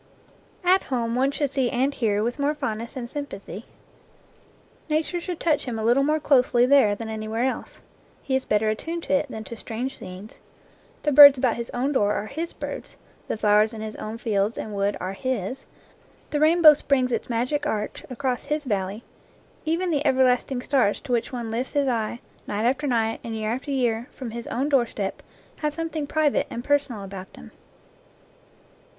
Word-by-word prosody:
At 370 Hz, +2 st, +5 dB
home 235 Hz, -3 st, -1 dB
one 260 Hz, +3 st, +2 dB
should 285 Hz, -1 st, -1 dB
see 265 Hz, -3 st, +1 dB
and 265 Hz, +2 st, +1 dB
hear 210 Hz, -5 st, 0 dB
with 240 Hz, +5 st, -2 dB
more 290 Hz, +2 st, +1 dB
fond 260 Hz, -7 st, -3 dB
ness 235 Hz, +2 st, -8 dB
and 245 Hz, -2 st, -4 dB
sympathy. 235 Hz, -, -7 dB, 1.2 s
Nature 315 Hz, +3 st, 0 dB
should 355 Hz, -1 st, -5 dB
touch 310 Hz, -4 st, +1 dB
him 240 Hz, -3 st, -3 dB
a 220 Hz, -, -3 dB
little 240 Hz, +4 st, +4 dB
more 305 Hz, +3 st, +2 dB
closely 250 Hz, -4 st, +4 dB
there 255 Hz, -6 st, +5 dB
than 225 Hz, +2 st, -6 dB
anywhere 220 Hz, +1 st, -3 dB
else. 260 Hz, -, -3 dB, 0.4 s
He 265 Hz, -, 0 dB
is 265 Hz, -, +1 dB
better 210 Hz, +1 st, +1 dB
attuned 330 Hz, +10 st, -3 dB
to -, -, -2 dB
it 285 Hz, 0 st, +1 dB
than 220 Hz, -3 st, -6 dB
to 230 Hz, -, -8 dB
strange 235 Hz, +4 st, -5 dB
scenes. 185 Hz, +3 st, -9 dB, 0.7 s
The 295 Hz, -, +2 dB
birds 285 Hz, 0 st, +10 dB
about 250 Hz, -2 st, +1 dB
his 235 Hz, 0 st, -5 dB
own 255 Hz, +4 st, -1 dB
door 205 Hz, -7 st, +2 dB
are 205 Hz, -, -2 dB
his 325 Hz, +9 st, -4 dB
birds, -, -, -7 dB, 0.3 s
the -, -, -2 dB
flowers 210 Hz, +1 st, +3 dB
in 215 Hz, -, -7 dB
his 215 Hz, -1 st, -6 dB
own 215 Hz, +1 st, -5 dB
fields 215 Hz, -2 st, 0 dB
and 215 Hz, -, -5 dB
wood 200 Hz, 0 st, 0 dB
are 185 Hz, +2 st, -4 dB
his, 255 Hz, +2 st, -3 dB, 0.6 s
the 295 Hz, -, 0 dB
rainbow 315 Hz, 0 st, +7 dB
springs 270 Hz, -3 st, +1 dB
its -, -, -2 dB
magic 255 Hz, +6 st, -1 dB
arch 215 Hz, -7 st, -3 dB
across 255 Hz, -1 st, -2 dB
his 300 Hz, +1 st, -1 dB
valley, 205 Hz, -2 st, -2 dB, 0.6 s
even 340 Hz, +3 st, 0 dB
the 295 Hz, -2 st, +1 dB
everlasting 255 Hz, -2 st, +2 dB
stars 255 Hz, -8 st, +2 dB
to 275 Hz, -, -7 dB
which 235 Hz, -1 st, 0 dB
one 240 Hz, -3 st, -4 dB
lifts 245 Hz, +3 st, -3 dB
his 285 Hz, -2 st, +2 dB
eye, 235 Hz, -1 st, -1 dB, 0.3 s
night 210 Hz, +2 st, -1 dB
after 265 Hz, +4 st, +1 dB
night, 225 Hz, -3 st, 0 dB
and 225 Hz, -1 st, -5 dB
year 215 Hz, 0 st, -2 dB
after 260 Hz, +4 st, -4 dB
year, 240 Hz, -3 st, 0 dB
from 250 Hz, -4 st, -7 dB
his 235 Hz, +1 st, -6 dB
own 265 Hz, +4 st, -1 dB
doorstep, 235 Hz, -8 st, 0 dB, 0.4 s
have 300 Hz, -1 st, -2 dB
something 320 Hz, -2 st, -3 dB
private 305 Hz, -1 st, +1 dB
and 235 Hz, -, -5 dB
personal 280 Hz, -7 st, 0 dB
about 190 Hz, -1 st, -9 dB
them. 75 Hz, -, -13 dB
250 Hz, 190 wpm, -24 LUFS, 220-285 Hz, 1.2 s, birds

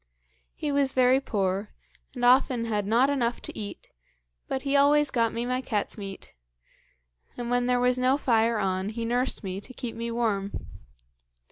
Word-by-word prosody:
He 295 Hz, -, -3 dB
was 280 Hz, -2 st, +1 dB
very 255 Hz, +1 st, +4 dB
poor, 200 Hz, -5 st, -2 dB, 0.4 s
and 245 Hz, -1 st, -1 dB
often 250 Hz, -1 st, +4 dB
had 210 Hz, -3 st, -1 dB
not 235 Hz, +5 st, +4 dB
enough 245 Hz, -4 st, 0 dB
to -, -, -6 dB
eat, 205 Hz, -2 st, -7 dB, 0.6 s
but 265 Hz, -, -3 dB
he 280 Hz, 0 st, 0 dB
always 290 Hz, +1 st, +4 dB
got 230 Hz, -2 st, +1 dB
me 235 Hz, +1 st, -3 dB
my 255 Hz, +1 st, -1 dB
cat's 215 Hz, -6 st, -2 dB
meat; 195 Hz, -2 st, -9 dB, 1.0 s
and 240 Hz, -1 st, -4 dB
when 245 Hz, 0 st, +1 dB
there 250 Hz, 0 st, +2 dB
was 250 Hz, 0 st, +2 dB
no 255 Hz, +2 st, +3 dB
fire 230 Hz, -4 st, +2 dB
on, 190 Hz, 0 st, -1 dB
he 230 Hz, +1 st, -4 dB
nursed 245 Hz, +1 st, 0 dB
me 190 Hz, 0 st, -4 dB
to 255 Hz, -, -11 dB
keep 245 Hz, -3 st, -5 dB
me 230 Hz, 0 st, -4 dB
warm. 215 Hz, -4 st, -1 dB
240 Hz, 170 wpm, -27 LUFS, 215-255 Hz, 1.0 s, very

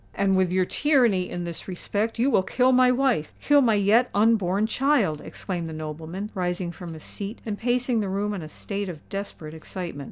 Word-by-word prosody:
"And 195 Hz, -1 st, +2 dB
with 185 Hz, -1 st, +2 dB
your 185 Hz, 0 st, +2 dB
tyranny 240 Hz, -9 st, +2 dB
in 175 Hz, 0 st, -4 dB
this 170 Hz, -1 st, -6 dB
respect 205 Hz, +5 st, -2 dB
you 255 Hz, +4 st, +2 dB
will 190 Hz, -, +4 dB
kill 250 Hz, +7 st, +2 dB
my 255 Hz, 0 st, +5 dB
wife—kill 265 Hz, -, +2 dB
my 230 Hz, -5 st, +3 dB
yet 215 Hz, +5 st, +4 dB
unborn 205 Hz, -2 st, +3 dB
child!" 250 Hz, -, +1 dB
exclaimed 175 Hz, -4 st, -5 dB
the 160 Hz, -, -6 dB
nobleman, 160 Hz, +6 st, -6 dB
rising 180 Hz, -2 st, -2 dB
from 170 Hz, -1 st, -8 dB
his 155 Hz, -, -11 dB
seat 205 Hz, +3 st, -6 dB
and 215 Hz, -2 st, -2 dB
pacing 245 Hz, +1 st, 0 dB
the 205 Hz, -2 st, -1 dB
room 205 Hz, +2 st, -1 dB
in 195 Hz, -, -4 dB
a 155 Hz, -, -8 dB
state 200 Hz, +3 st, -4 dB
of 160 Hz, -4 st, -9 dB
desperate 195 Hz, -6 st, -6 dB
excitement. 165 Hz, -1 st, -6 dB
200 Hz, 195 wpm, -25 LUFS, 175-230 Hz, -, my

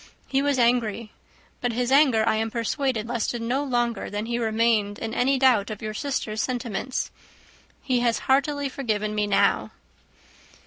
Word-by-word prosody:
He 270 Hz, 0 st, +1 dB
was 285 Hz, -1 st, +1 dB
angry. 235 Hz, -3 st, +1 dB, 0.5 s
But 245 Hz, -1 st, -1 dB
his 245 Hz, +2 st, -1 dB
anger, 260 Hz, -6 st, +4 dB
I 220 Hz, -, +3 dB
am 225 Hz, 0 st, -1 dB
persuaded, 235 Hz, 0 st, -1 dB
lasted 240 Hz, 0 st, -2 dB
no 245 Hz, +5 st, -1 dB
longer 240 Hz, -5 st, -1 dB
than 205 Hz, +1 st, -3 dB
he 235 Hz, +1 st, -2 dB
remained 220 Hz, -2 st, +1 dB
in 225 Hz, -1 st, -5 dB
any 265 Hz, +3 st, +2 dB
doubt 250 Hz, -6 st, +3 dB
of 215 Hz, -1 st, -6 dB
your 215 Hz, 0 st, -3 dB
sister's 220 Hz, -4 st, -2 dB
sentiments. 250 Hz, -1 st, -3 dB, 0.7 s
He 255 Hz, -3 st, +1 dB
has 235 Hz, -1 st, +1 dB
heartily 280 Hz, +1 st, +2 dB
forgiven 215 Hz, -6 st, -2 dB
me 210 Hz, -1 st, 0 dB
now." 200 Hz, -, +2 dB
235 Hz, 160 wpm, -25 LUFS, 220-260 Hz, 0.7 s, anger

